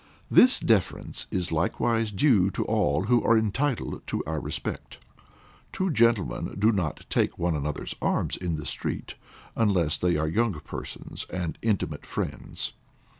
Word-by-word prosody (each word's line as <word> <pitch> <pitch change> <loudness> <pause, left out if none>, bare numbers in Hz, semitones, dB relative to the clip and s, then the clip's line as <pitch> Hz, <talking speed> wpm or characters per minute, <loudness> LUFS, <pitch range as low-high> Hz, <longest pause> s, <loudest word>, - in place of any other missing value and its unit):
This 255 - +7
deference 100 -5 0
is 90 -1 -2
likewise 110 +7 +1
due 105 -4 +4
to - - 0
all 75 +4 +1
who 120 +3 +3
are 115 - +5
entitled 115 +5 -1
to - - -2
our 80 0 -2
respect. - - -5 0.7
Two 190 -1 -1
gentlemen 115 - +2
do 105 +3 +4
not 90 -8 -2
take - - 0
one 85 -1 0
another's 75 0 -3
arms - - 0
in 90 -3 -2
the 75 -1 -6
street, - - -3 0.4
unless 95 -8 +2
they 90 -3 +2
are 80 +1 0
young 110 +4 +1
persons 75 - -7
and 90 -3 -4
intimate 110 -3 -1
friends. - - -4
95 Hz, 145 wpm, -27 LUFS, 80-115 Hz, 0.7 s, This